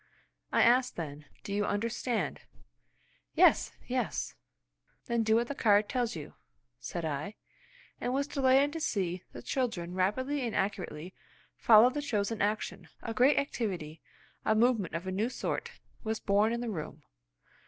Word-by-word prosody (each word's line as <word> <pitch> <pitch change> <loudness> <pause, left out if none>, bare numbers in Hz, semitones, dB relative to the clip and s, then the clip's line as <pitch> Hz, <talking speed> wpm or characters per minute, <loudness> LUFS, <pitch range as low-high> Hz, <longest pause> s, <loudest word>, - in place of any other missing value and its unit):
I - - +4
asked 250 +2 +4
then, 150 -3 -6 0.2
"Do 200 - -5
you 205 +1 +1
understand?" 225 +1 -1 0.9
"Yes! - - +5
Yes!" - - -2 0.7
"Then 235 -1 0
do 220 0 +3
what 235 +1 +2
the 285 - -3
card 210 -5 +3
tells 245 -5 -1
you," 150 -3 -8 0.5
said 165 - -4
I, 150 +7 -3 0.6
and 245 - -2
was 275 +2 +1
delighted 275 0 +3
to 325 - -3
see 185 - -1
the - - -9
children 195 -10 -2
rapidly 260 +10 0
and 235 -3 -2
accurately 185 -3 -3 0.4
follow 230 +2 +7
the 295 +2 -3
chosen 215 -5 -1
action. 210 +2 -1 0.2
A 230 - -3
great 255 +6 +4
activity, 180 - -2 0.4
a 220 - +2
movement 225 -6 +2
of 170 +2 -4
a 190 - -3
new 210 +5 0
sort, - - -3 0.3
was 220 -1 -2
born 205 +2 +2
in 235 0 -2
the 240 -2 -3
room. 160 -6 -6
220 Hz, 155 wpm, -31 LUFS, 185-250 Hz, 0.9 s, follow